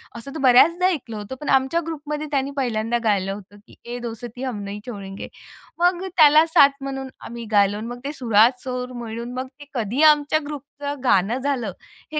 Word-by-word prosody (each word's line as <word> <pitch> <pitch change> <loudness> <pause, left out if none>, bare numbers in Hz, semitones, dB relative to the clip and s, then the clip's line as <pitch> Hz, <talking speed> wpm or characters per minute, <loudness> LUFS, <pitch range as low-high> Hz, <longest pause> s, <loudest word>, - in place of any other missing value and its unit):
असं 235 +4 -8
तर - - -4
बऱ्याचदा 325 +8 +5
ऐकलं 260 - -3
होतं, 210 +5 -7
पण 295 - -4
आमच्या 270 +5 +3
ग्रुपमध्ये 300 -1 -4
त्यांनी 275 -1 0
पहिल्यांदा 235 -3 0
गायलं 195 -3 +1
होतं, 205 0 -12
की - - -17
"ये 240 +1 -4
दोस्ती 240 +1 -7
हम 250 -5 -3
नही 200 +1 -6
छोडेंगे" 195 -4 -7 0.5
मग 355 +1 +2
त्याला 305 0 +7
साथ 285 -3 +6
म्हणून 270 -1 -5 0.2
आम्ही 235 0 -7
गायलो 205 -1 +3
आणि 220 +2 -6
मग 245 +1 -7
ते 285 - -2
सुरात 240 -2 +3
सुर 250 -1 -4
मिळून 235 +1 -6
मग 255 +1 -4
ते 290 - -11
कधी 235 +2 -1
आमच्या 300 0 +5
ग्रुपचं 285 0 -6
गाणं 205 0 +3
झालं 260 -6 -1 0.4
हे 305 - 0
250 Hz, 185 wpm, -22 LUFS, 225-290 Hz, 0.5 s, त्याला